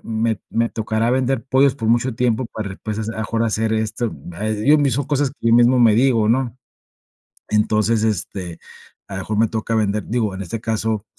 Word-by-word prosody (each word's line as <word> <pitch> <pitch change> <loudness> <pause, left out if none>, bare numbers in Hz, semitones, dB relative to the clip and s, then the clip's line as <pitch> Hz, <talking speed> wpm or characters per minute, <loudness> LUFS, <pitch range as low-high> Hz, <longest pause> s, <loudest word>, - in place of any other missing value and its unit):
me 110 -2 -1
me 115 0 +1
tocará 110 +1 -1
vender 130 -1 0
pollos 135 0 +3
por 115 -4 -4
mucho 120 +2 +2
tiempo 125 -1 +1
para 110 -3 -6
después, 105 +2 -5
a 115 - -3
lo - - -8
mejor 115 +1 -1
hacer 110 0 0
esto". 110 +1 -2 0.2
Ah, 105 +6 -4
yo 110 +8 +3
mismo 140 -1 +1
cosas 140 -1 0
que 115 -4 -3
yo 115 - +5
mismo 120 +1 +5
me 115 -3 +6
digo, 115 -3 +3
¿no? 125 0 0 0.9
Entonces, 110 +1 +2
este, 95 -4 -3 0.5
a 95 - -6
lo - - -3
mejor 105 +2 -3
me 115 - +4
toca 110 0 -2
vender, 105 -1 0
digo, 110 -3 -1
en 95 - -6
este 105 +5 -5
caso, 110 -1 -2
110 Hz, 200 wpm, -20 LUFS, 110-120 Hz, 0.9 s, me